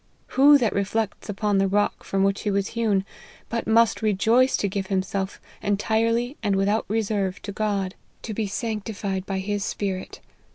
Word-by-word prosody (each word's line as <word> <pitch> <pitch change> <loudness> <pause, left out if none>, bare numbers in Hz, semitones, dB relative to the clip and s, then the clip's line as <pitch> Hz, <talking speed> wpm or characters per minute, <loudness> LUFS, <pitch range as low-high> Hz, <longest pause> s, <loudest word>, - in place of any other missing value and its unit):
Who 285 +2 +7
that 230 -7 +1
reflects 205 +2 -2
upon 205 0 +1
the 195 - +3
rock 205 +2 0
from 195 0 0
which 195 0 +1
he 210 - -1
was 200 -1 0
hewn, 215 -4 +1 0.4
but 230 -1 -2
must 225 0 +4
rejoice 225 +5 +3
to 205 - 0
give 195 0 -3
him 190 -1 +1
self 190 0 -4 0.2
entirely 230 +5 +1
and 205 -3 +1
without 200 +3 +1
reserve 205 -3 -1
to 200 - -5
God, 200 -2 -1 0.3
to 220 - -4
be 215 0 -1
sanctified 205 -3 -3
by 195 - -2
his 200 +1 -2
Spirit. 190 -2 -3
205 Hz, 170 wpm, -24 LUFS, 195-225 Hz, 0.4 s, Who